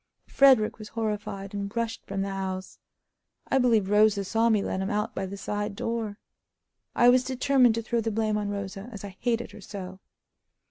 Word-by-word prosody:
Frederick 260 -6 +4
was 215 - -8
horrified, 210 -3 -4
and 200 +1 -4
rushed 230 -1 -2
from 195 0 -2
the 200 - -3
house. 190 -1 -5 0.7
I 270 - +3
believe 230 -6 +3
Rosa 210 -1 +4
saw 225 +4 +2
me 215 -3 +3
let 190 - -2
him 190 - -2
out 210 -1 -1
by 190 - -3
the 200 +2 -7
side 205 +1 -3
door. 225 -2 -3 0.8
I 240 - +5
was 250 +1 +5
determined 260 -2 +3
to 230 - -2
throw 235 +1 0
the 225 - -1
blame 215 0 0
on 210 -1 -1
Rosa, 200 +1 -5
as 205 -3 -8
I 200 -2 -8
hated 240 -1 -1
her - - -12
so. 190 -1 -8
210 Hz, 190 wpm, -27 LUFS, 200-230 Hz, 0.8 s, I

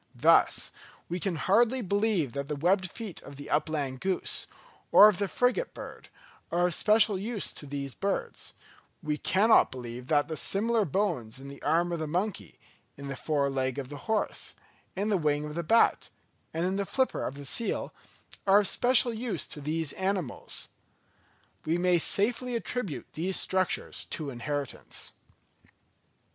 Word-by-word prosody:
Thus, - - +4 0.4
we 175 - -2
can 185 -1 -1
hardly 235 +9 +2
believe 200 - +1
that 140 +1 -4
the 150 - -2
webbed 185 +5 +2
feet 215 -3 -8
of 140 - -11
the 145 +1 -9
upland 145 -4 0
goose, 190 +3 -1 0.4
or 210 - +10
of 205 -3 +2
the 200 - +1
frigate 250 - 0
bird, - - -9 0.4
are 175 +1 +2
of 180 - +1
special 215 +1 +4
use 215 +1 -3
to 145 - -8
these 140 -1 -4
birds; 200 -1 -3 0.5
we 150 -1 -1
cannot 215 +4 +4
believe 125 0 -7
that 145 -1 +2
the 160 - -4
similar 220 +6 +2
bones 150 - -1
in 135 +1 -9
the 140 - -11
arm 175 +2 +2
of 170 - -2
the 155 - -3
monkey, 170 - -3 0.4
in 140 0 -7
the 135 - -4
fore 145 +1 0
leg 130 -1 -1
of 135 -2 -5
the 145 - -7
horse, 220 -2 -1 0.4
in 200 +3 -1
the 205 - +3
wing 150 -2 0
of 150 - -6
the 170 - -2
bat, 225 +8 +3 0.4
and 165 +2 -1
in 190 +1 0
the 200 - -1
flipper 260 -1 0
of 130 - -4
the 140 0 -9
seal, 230 - -2 0.5
are 200 +2 +7
of 200 - +3
special 245 -1 +4
use 225 0 -2
to 150 - -6
these 155 +1 -1
animals. 190 -8 -3 1.0
We 165 +2 0
may 175 -1 +3
safely 240 +8 0
attribute 215 - -4
these 180 +4 0
structures 185 -1 -1
to 150 -4 -5
inheritance. 140 +3 -5
175 Hz, 165 wpm, -29 LUFS, 145-205 Hz, 1.0 s, or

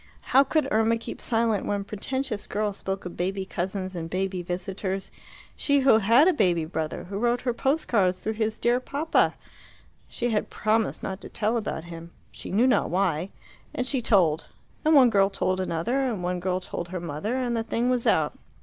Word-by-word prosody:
How 270 - +8
could 310 +2 +1
Irma 225 +1 +3
keep 230 - -8
silent 225 -3 0
when 205 -1 -1
pretentious 215 +2 -3
girls 205 -1 -2
spoke 195 0 -4
of 180 - -6
baby 190 +2 -2
cousins 190 0 -3
and 165 -2 -5
baby 185 +1 -2
visitors 185 +2 -4 0.4
she 285 -1 +2
who 260 -4 +6
had 230 - +5
a 370 - +5
baby 175 - +2
brother, 160 -1 -4
who 200 +2 -5
wrote 240 +1 +1
her 245 -2 -1
post 275 +6 0
cards 185 -5 +2
through 220 - -1
his 220 0 -1
dear 240 +1 +2
papa? 285 +5 +1 0.7
She 240 0 -2
had 210 - 0
promised 215 +1 0
not 190 0 -4
to - - -9
tell 220 +2 0
about 210 -8 -3
him 170 0 -9 0.2
she - - -9
knew 215 +6 +3
not 260 - +3
why 180 -1 0 0.5
and 250 - -1
she 260 -1 0
told. 175 -9 +2 0.4
And 315 0 +4
one 255 -4 +7
girl 195 -2 +4
told 190 -1 -1
another, 185 +9 -1
and 240 -9 -1
one 180 0 -1
girl 185 0 -1
told 175 -2 -5
her 180 +1 -5
mother, 170 - -3
and 250 -2 -1
the 230 - 0
thing 235 +2 0
was 250 -2 0
out. - - +3
205 Hz, 195 wpm, -26 LUFS, 185-240 Hz, 0.7 s, How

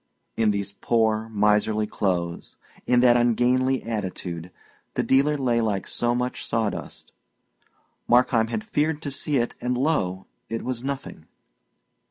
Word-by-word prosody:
In 110 -1 +2
these 100 -1 -1
poor, 110 +1 0
miserly 105 0 +2
clothes, 90 -5 -2 0.3
in 125 -1 +4
that 120 -1 +6
ungainly 125 +2 +2
attitude, 90 -6 -4 0.5
the - - +1
dealer 140 +3 +3
lay 120 -4 +1
like 105 -3 -1
so 120 0 0
much 125 +1 -2
sawdust. 110 -3 -3 1.0
Markheim 120 -2 +4
had 215 - -3
feared 155 -7 -1
to 140 - -3
see 140 +1 -1
it, 120 -1 0
and, 125 0 -1
lo! 95 - 0 0.2
it 115 - -3
was 125 -1 -3
nothing. 135 - -5
120 Hz, 135 wpm, -25 LUFS, 105-130 Hz, 1.0 s, that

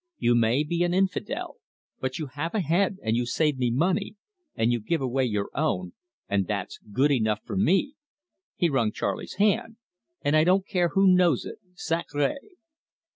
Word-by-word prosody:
You 120 - +2
may 120 +4 +3
be 170 +3 -1
an 175 0 0
infidel, 190 -1 -1 0.4
but 130 0 -3
you 155 - -3
have 145 +7 -5
a - - +2
head, 185 +4 +1
and 110 +1 +1
you 120 0 0
save 150 +1 0
me 125 -1 +1
money, 180 - 0 0.4
and 115 +2 +2
you 120 - +1
give 160 +10 -1
away 130 0 0
your 105 -4 -2
own, 90 - -1 0.3
and 100 -2 0
that's 100 -3 -4
good 135 +7 +2
enough 110 -5 +1
for - - -5
me," 195 +8 +2 0.6
he 175 - +2
wrung 125 -8 +1
Charley's - - -4
hand, 210 +3 +1 0.5
"and 145 - +2
I 155 - +5
don't 185 +3 +3
care 175 -3 +1
who 195 0 +5
knows 180 -7 +4
it - - -8 0.2
sacre!" 155 -5 -1
150 Hz, 180 wpm, -26 LUFS, 120-180 Hz, 0.6 s, I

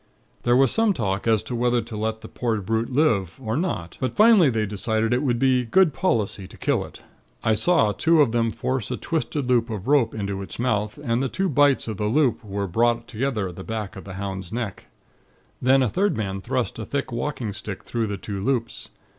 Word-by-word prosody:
There 120 0 +3
was 135 -2 +4
some 225 -2 +3
talk 100 - -2
as 110 -2 +3
to - - -6
whether 120 0 +2
to 115 0 -8
let 110 +1 -2
the 110 - -9
poor 115 -2 -2
brute 110 +5 -1
live, 115 - +1
or 115 -3 -3
not; 135 - -3
but 130 - -1
finally 215 -8 +6
they 110 -3 0
decided 110 +2 0
it 125 - +1
would 125 -5 +1
be 130 0 +3
good 165 +6 +3
policy 110 - -1
to - - -14
kill - - 0
it. - - -12 0.4
I 110 - +3
saw 110 0 +3
two 165 +9 +3
of 140 -6 +4
them 115 -1 +1
force 130 -1 -2
a - - -2
twisted 150 -4 -2
loop 120 -2 +2
of 110 -1 -5
rope 135 -6 +3
into 100 -2 -3
its 95 - -8
mouth, 105 -2 -1
and 120 -2 0
the 135 - 0
two 190 0 -1
bights 145 -2 +3
of 110 -3 -4
the 105 - -1
loop 125 +1 +2
were 100 -1 -3
brought 115 +5 +1
together 115 -4 -2
at 90 - -11
the 95 - -7
back 110 -1 -5
of 95 - -9
the 95 -1 -8
hound's 95 -2 -5
neck. 110 -5 -4 0.7
Then 130 +1 +4
a - - +2
third 190 - 0
man 95 -3 -3
thrust 125 +1 -2
a 110 - -4
thick 140 -2 -3
walking 120 -3 -3
stick 100 -1 -7
through 115 -2 -2
the 100 -1 -3
two 100 0 -5
loops. 120 -3 -2
115 Hz, 220 wpm, -24 LUFS, 105-130 Hz, 0.7 s, finally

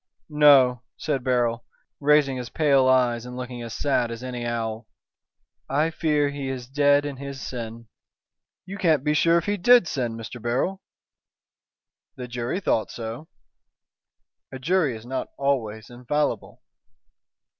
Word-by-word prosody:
"No," 140 -5 +5 0.2
said 140 -5 -2
Beryl, 120 -2 0 0.4
raising 145 -2 +3
his 125 -2 -6
pale 140 -3 +3
eyes 125 -3 +3
and 125 0 -8
looking 125 -1 -6
as 115 -1 -6
sad 125 -4 0
as 115 +1 -7
any 125 -2 -4
owl. 115 -1 -3 0.8
"I 150 +4 +1
fear 150 -3 +1
he 140 -2 -5
is 125 -2 -5
dead 145 +1 +3
in 140 -2 -5
his 140 0 -7
sin." 115 -3 -7 0.8
"You 195 +2 -8
can't 155 -6 +2
be 150 0 +1
sure 165 +3 +4
if 170 - -1
he 205 0 0
did 240 0 +5
sin, 120 -6 -2
Mr. 115 +1 -8
Beryl." 130 - -1 1.3
"The 125 - -7
jury 120 +7 -3
thought 115 - 0
so." 115 +6 -7 1.2
"A 130 - -6
jury 155 -2 +1
is 110 +1 -11
not 130 +1 -3
always 115 -6 -2
infallible!" 125 +5 -2
130 Hz, 145 wpm, -24 LUFS, 120-150 Hz, 1.3 s, No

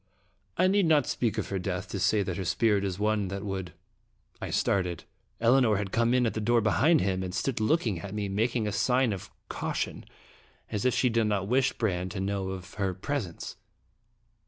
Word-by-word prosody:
I - - +4
need 195 -1 +3
not 150 -4 +4
speak 115 -2 -1
of 110 - -2
her 95 - -1
death 90 - -3
to - - -3
say 105 -2 +3
that 90 -2 -4
her 95 - -2
spirit 105 +1 +2
is 95 -2 -2
one 105 -1 +1
that 100 +2 -5
would" 95 -3 -4 0.7
I - - -4
started. 90 -4 0 0.4
Elinor 120 -1 +4
had 100 -1 -3
come 115 +1 +2
in 125 -1 +3
at 115 - 0
the 110 - -3
door 120 +2 +3
behind 145 +9 +3
him, 95 -1 0
and 90 0 -4
stood 125 +4 -1
looking 110 - +1
at 100 +3 -7
me, 105 -1 -2
making 110 +3 0
a - - -1
sign 125 +3 +2
of 95 - -7 0.2
caution, - - -3 0.7
as 105 +1 -2
if 125 - +3
she 125 - +3
did 115 -1 +2
not 100 -2 0
wish 130 +3 +2
Brande 95 -5 -1
to 100 - -4
know 95 0 -2
of 95 -1 -7
her 95 -2 0
presence. 100 -4 -4
105 Hz, 205 wpm, -28 LUFS, 95-120 Hz, 0.7 s, I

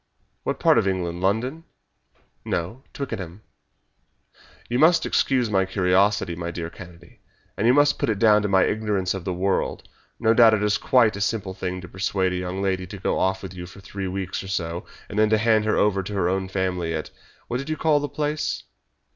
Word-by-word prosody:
"What - - -3
part - - +5
of - - 0
England 90 -2 -2
London?" 120 - 0 0.8
"No, 90 +10 -3
Twickenham." 105 -8 -6 1.2
"You 120 +1 -1
must 165 +2 +5
excuse 125 -5 +1
my 95 -1 +3
curiosity, 95 0 +2
my 85 0 -4
dear 85 -1 -5
Kennedy, 85 -2 -14 0.4
and 110 - 0
you 125 - +6
must 145 0 +4
put - - 0
it 110 - 0
down 105 -1 +5
to 105 - -1
my 95 -1 +4
ignorance 105 -4 0
of 95 -3 -6
the 95 - -1
world. 95 +2 -1 0.3
No 115 -1 +4
doubt 115 -1 +7
it 105 - -2
is 105 0 +1
quite 120 -5 +3
a 100 - -5
simple 100 -2 -1
thing 90 -1 -4
to 90 - -9
persuade 95 +1 -1
a - - -1
young 90 +2 -3
lady 95 -1 -1
to 100 - -8
go 95 - -1
off 95 +1 0
with 95 - -7
you 90 -1 -8
for 90 - -13
three 100 0 -6
weeks 95 0 -3
or 95 - -9
so, 85 -2 -3 0.2
and 100 - -3
then 110 0 +4
to 110 - +4
hand 110 -1 +3
her 110 - +1
over 100 -2 +2
to 95 +3 -7
her 95 -3 +1
own 95 +1 -1
family 90 -3 -1
at 80 - -5 0.4
what 120 - -2
did 140 +4 -6
you 155 - -1
call 155 -2 +3
the 145 0 -3
place?" 150 0 -2
95 Hz, 210 wpm, -24 LUFS, 90-110 Hz, 1.2 s, doubt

